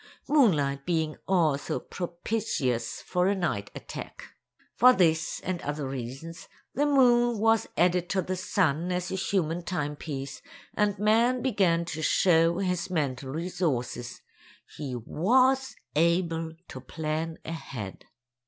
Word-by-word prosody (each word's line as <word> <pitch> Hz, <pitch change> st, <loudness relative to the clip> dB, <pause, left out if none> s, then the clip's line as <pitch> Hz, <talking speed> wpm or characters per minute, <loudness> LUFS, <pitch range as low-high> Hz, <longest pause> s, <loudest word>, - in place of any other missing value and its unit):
—moonlight 150 Hz, -, +3 dB
being 160 Hz, -2 st, 0 dB
also 160 Hz, -7 st, +1 dB
propitious 170 Hz, -, -3 dB
for 180 Hz, 0 st, +1 dB
a 200 Hz, -, +2 dB
night 135 Hz, -, -2 dB
attack. -, -, -9 dB, 0.4 s
For 250 Hz, +1 st, +7 dB
this 160 Hz, -5 st, +2 dB
and 180 Hz, -1 st, -3 dB
other 145 Hz, -1 st, -3 dB
reasons, 135 Hz, +6 st, -7 dB, 0.3 s
the 290 Hz, +4 st, +1 dB
moon 240 Hz, -4 st, +4 dB
was 225 Hz, +1 st, +3 dB
added 175 Hz, +1 st, +2 dB
to 190 Hz, -2 st, 0 dB
the 185 Hz, +2 st, -2 dB
sun 180 Hz, -3 st, 0 dB
as 180 Hz, +1 st, -2 dB
a -, -, -1 dB
human 175 Hz, -3 st, 0 dB
timepiece, 150 Hz, -5 st, -4 dB, 0.3 s
and 210 Hz, -1 st, +1 dB
man 230 Hz, +5 st, +3 dB
began 185 Hz, -9 st, +2 dB
to 160 Hz, -2 st, -5 dB
show 165 Hz, 0 st, +3 dB
his 180 Hz, -2 st, -1 dB
mental 140 Hz, -6 st, -2 dB
resources—he 140 Hz, -3 st, -5 dB
was 260 Hz, -, +2 dB, 0.2 s
able 165 Hz, 0 st, +1 dB, 0.2 s
to 130 Hz, -, -8 dB
plan 160 Hz, +4 st, -3 dB
ahead. 130 Hz, -, -7 dB
170 Hz, 120 wpm, -28 LUFS, 150-195 Hz, 0.4 s, For